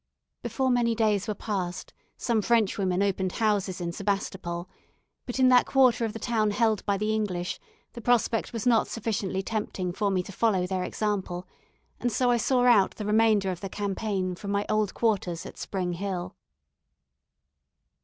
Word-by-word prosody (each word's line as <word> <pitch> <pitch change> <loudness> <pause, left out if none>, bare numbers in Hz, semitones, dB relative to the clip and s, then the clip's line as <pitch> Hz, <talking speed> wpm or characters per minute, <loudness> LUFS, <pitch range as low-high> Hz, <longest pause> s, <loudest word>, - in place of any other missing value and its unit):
Before 260 -1 0
many 235 -2 +2
days 215 -2 +1
were 215 - -2
passed, 185 -4 -4 0.2
some 230 -3 +1
Frenchwomen 200 -4 +2
opened 190 -2 0
houses 205 -4 0
in 170 -1 -3
Sebastopol; 190 -2 -3 0.6
but 245 - -3
in 260 -1 +5
that 250 -1 +5
quarter 255 -3 +4
of 220 - -4
the - - -5
town 225 -2 +1
held 215 0 +1
by 200 -1 +2
the 215 +2 0
English 185 -5 -2 0.3
the 235 - -8
prospect 230 -1 +1
was 230 -4 -4
not 235 -3 +4
sufficiently 205 -4 -2
tempting 190 -4 -3
for 205 +2 0
me 185 -2 0
to 200 - -9
follow 195 -3 +1
their 185 0 -2
example, 190 -4 -2 0.5
and 245 - 0
so 250 +2 +2
I 240 - +3
saw 250 +2 +2
out 220 -6 +5
the 210 - -5
remainder 210 -2 +3
of 175 - -6
the 195 - -4
campaign 195 -2 -2
from 200 +3 -7
my 200 0 0
old 215 -2 +1
quarters 190 -7 0
at - - -10
Spring 180 -3 -2
Hill. 185 0 -4
205 Hz, 170 wpm, -27 LUFS, 190-225 Hz, 0.6 s, in